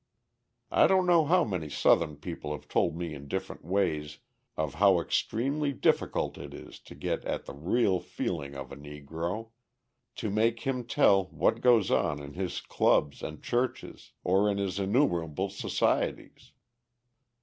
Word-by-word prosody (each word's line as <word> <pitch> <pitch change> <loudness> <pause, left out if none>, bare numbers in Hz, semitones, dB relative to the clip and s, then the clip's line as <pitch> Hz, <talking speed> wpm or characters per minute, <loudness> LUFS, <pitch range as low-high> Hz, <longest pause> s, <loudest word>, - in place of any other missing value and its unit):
I - - +5
don't 190 -1 +3
know 170 -3 +5
how 180 +3 +4
many 90 - -3
Southern 75 +1 +3
people 80 0 -6
have 75 - -9
told 80 - +1
me 85 -2 -4
in 70 -1 -9
different - - -5
ways 75 -5 -1 0.4
of 75 -3 -1
how 95 -3 +6
extremely 140 - -1
difficult - - 0
it - - -8
is - - -11
to - - -13
get - - -3
at - - -3
the - - -8
real 90 - +1
feeling 70 -7 -4
of 70 -1 -7
a - - -7
Negro, 80 +9 -6 0.6
to 110 - -3
make 115 +2 +1
him 125 -2 -2
tell 100 -7 +4
what 115 +4 0
goes 120 -6 +4
on 75 -2 +1
in 70 0 -9
his 90 0 -3
clubs 70 -1 +1
and 75 0 -7
churches 125 +1 -3
or 95 +3 +3
in 100 - 0
his 100 -1 -2
innumerable 95 - +1
societies. - - -1
95 Hz, 155 wpm, -29 LUFS, 75-115 Hz, 0.6 s, how